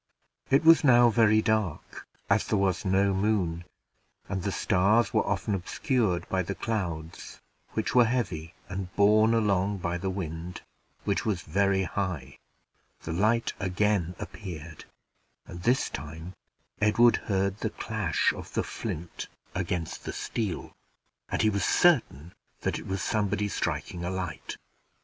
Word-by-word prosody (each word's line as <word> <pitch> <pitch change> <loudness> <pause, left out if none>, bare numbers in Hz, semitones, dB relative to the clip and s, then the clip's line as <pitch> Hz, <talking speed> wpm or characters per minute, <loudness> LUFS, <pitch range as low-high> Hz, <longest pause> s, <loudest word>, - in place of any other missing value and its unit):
It 135 +3 +4
was 165 0 +7
now 120 -3 +6
very 110 -1 +4
dark, 110 -8 -2 0.2
as 100 +1 +2
there 105 - +1
was 95 -1 0
no 95 +1 +3
moon, 95 -4 0 0.6
and 95 -2 -3
the 100 +2 -2
stars 100 +5 +2
were - - +3
often 105 - -1
obscured 100 +1 0
by 95 - 0
the 95 +2 -4
clouds, 85 -8 -4 0.3
which - - -1
were 125 -1 +6
heavy 95 -9 -2
and 95 -1 -5
borne 110 +2 +5
along 100 -2 +1
by 85 -1 -2
the 95 - -2
wind, 85 -2 -5 0.4
which 100 - 0
was 100 -5 -1
very 95 +3 +1
high. 85 -7 -4 0.6
The 80 - -4
light 110 +6 +1
again 95 -2 0
appeared, 80 -5 -8 0.6
and 85 - -9
this 125 +7 +2
time 80 +5 -7 0.5
Edward 115 +3 +5
heard 100 0 0
the 110 - -1
clash 105 -8 0
of - - -9
the - - +1
flint 85 +2 -6 0.3
against 90 -2 -3
the - - -4
steel, 105 -6 -3 0.6
and - - 0
he 110 - +4
was 100 -1 -1
quite - - +1
certain 110 - +3 0.3
that - - -1
it - - -10
was 95 0 -2
somebody 105 -1 0
striking 90 -3 -3
a 90 - -2
light. 95 -1 -5
95 Hz, 145 wpm, -28 LUFS, 90-110 Hz, 0.6 s, was